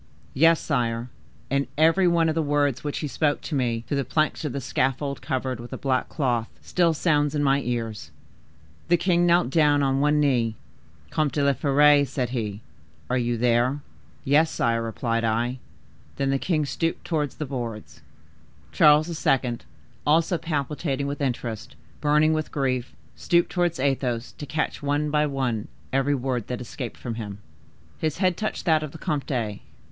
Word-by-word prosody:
"Yes, 165 +3 +5
sire; 120 -4 -1 0.4
and 140 0 +1
every 165 +4 +4
one 170 -1 +3
of 160 - +1
the 165 - 0
words 145 -3 +1
which 145 -1 -3
he 150 - -2
spoke 145 +1 0
to - - -6
me, 120 -4 0
through 145 - -2
the 140 - +1
planks 155 +6 0
of 150 - -2
the 140 - -3
scaffold 135 +2 -1
covered 130 -3 -2
with 120 +1 -9
a - - -4
black 130 -2 0
cloth, 120 -6 -1
still 170 -3 +1
sounds 150 -2 +1
in 145 - +1
my 140 0 +3
ears. 115 -4 -4 0.8
The 175 +1 +4
king 175 0 +2
knelt 170 -6 +3
down 145 -2 +4
on 135 0 +1
one 150 +1 +3
knee: 120 -6 +2 0.6
'Comte 155 -2 0
de 145 - +1
la 140 0 +4
Fere,' 145 +2 +5
said 130 -2 -2
he, 105 -4 -3 0.5
'are 130 - +2
you 120 -1 0
there?' 120 +4 +2 0.4
'Yes, 150 +3 +4
sire,' 115 -1 0
replied 115 +1 -2
I. 120 +3 0 0.6
Then 135 -1 0
the 135 - +1
king 155 -3 0
stooped 165 +3 -2
towards 150 -4 -1
the 155 - -4
boards." 120 -5 -6 0.7
Charles 150 +1 +5 0.2
II., 125 -3 +2 0.5
also 165 +3 +2
palpitating 145 -2 -2
with 140 +1 -4
interest, 125 -2 -3 0.2
burning 150 +1 +3
with 155 0 -2
grief, 130 -3 -1 0.2
stooped 170 0 +2
towards 175 -4 0
Athos, 130 -3 -1
to 145 - -6
catch, 155 +1 -2
one 145 +1 0
by 150 0 +2
one, 130 -6 -2 0.3
every 135 +2 +2
word 125 -4 -2
that 125 - -4
escaped 125 0 -6
from 120 - -5
him. 100 -2 -6 0.6
His 155 -2 -1
head 185 -1 +2
touched 215 +3 -3
that 160 -3 +4
of 155 -2 -6
the - - -8
comte. 125 -9 -2
140 Hz, 175 wpm, -25 LUFS, 125-155 Hz, 0.8 s, Yes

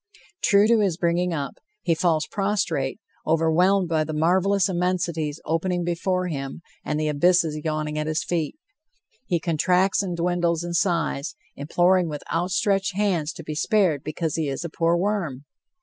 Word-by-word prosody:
True 200 0 +5
to 230 0 +4
his 190 -6 +1
bringing 175 0 +1
up, 145 -4 -4 0.3
he 170 - +2
falls 160 -2 +1
prostrate, 195 -8 -1 0.3
overwhelmed 170 +4 +3
by 160 -2 +1
the 155 0 -5
marvelous 185 +5 +2
immensities 175 -4 -1
opening 175 +2 0
before 180 +2 -1
him 140 0 -5 0.2
and 150 0 -2
the 155 - 0
abysses 155 0 +2
yawning 155 -1 -2
at 150 - -2
his 155 +2 -1
feet. 165 - -2 0.7
He 175 - +1
contracts 180 +4 +2
and 180 -3 -3
dwindles 170 -1 0
in 175 0 -4
size, 170 -5 0 0.2
imploring 175 +4 +2
with 150 -1 -6
outstretched 190 +2 0
hands 185 -7 0
to 165 - -9
be 155 - -5
spared 175 - +1
because 155 0 -3
he 160 -2 0
is 135 +4 -4
a - - -4
poor 165 +2 +1
worm. 170 -8 -2
170 Hz, 160 wpm, -24 LUFS, 155-185 Hz, 0.7 s, True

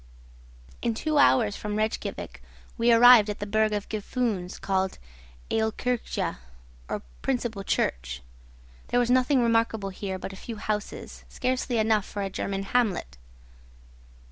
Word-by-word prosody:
In 230 -1 0
two 305 +5 +1
hours 225 -7 +4
from 210 -1 -4
Rejkiavik 215 +1 -3 0.3
we 235 0 +3
arrived 235 -2 +8
at 210 - -3
the 205 - -4
burgh 215 +1 +2
of 205 -1 -2
Gufunes, 215 -4 -2
called 190 -1 -1 0.5
Aolkirkja, 225 +2 -1 0.5
or - - -3 0.2
principal 235 -6 -2
church. 60 - -1 0.6
There 245 - +2
was 245 0 +2
nothing 255 0 +4
remarkable 225 -3 +1
here 190 0 -4
but 195 - -7
a - - -8
few 225 +4 -7
houses, 210 0 -4
scarcely 255 -1 -1
enough 220 -2 +2
for 205 - -4
a 195 - -3
German 195 +1 -3
hamlet. 205 - 0
220 Hz, 135 wpm, -27 LUFS, 200-240 Hz, 0.6 s, arrived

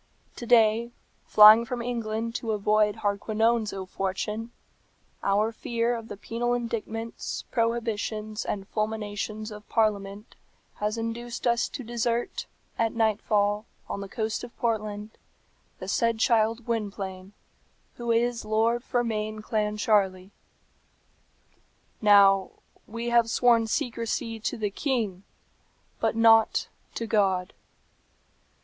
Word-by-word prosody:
"To 240 - -7
day, 230 0 +4 0.4
flying 215 +2 +9
from 250 0 -4
England 230 -1 -3
to 225 -2 -3
avoid 210 0 +1
Hardquanonne's 215 +2 +1
ill 190 -1 -5
fortune, 210 +5 -3 0.7
our 205 +3 +2
fear 235 +1 -1
of 225 -1 -7
the 205 - -8
penal 240 +3 -1
indictments, 230 -1 -4
prohibitions, 225 -2 -1
and 195 -1 -4
fulminations 215 0 -3
of 210 0 -11
Parliament 210 -2 -1 0.4
has 210 +2 -2
induced 230 +2 -4
us 235 -1 +2
to 265 - -7
desert, 235 0 -2 0.3
at 225 -1 +1
night 220 -2 +1
fall, 205 0 +1 0.2
on 200 - -4
the 200 - -7
coast 220 +2 -3
of 245 - -10
Portland, 215 -2 -2 0.7
the - - -8
said 230 -1 +1
child 225 0 +2
Gwynplaine, 200 -4 -4 0.6
who 235 -1 -5
is 235 0 +1
Lord 225 +3 +1
Fermain 215 -4 -2
Clancharlie. 210 -3 0 1.7
"Now, 200 -2 +6 0.4
we 230 +2 -4
have 235 -1 +3
sworn 235 -1 +3
secrecy 230 0 -2
to 235 +3 -3
the 210 -2 -2
king, 220 -6 -2 0.8
but - - 0
not 225 -1 +4 0.3
to 230 - -3
God. 195 -4 +1
220 Hz, 115 wpm, -27 LUFS, 210-230 Hz, 1.7 s, flying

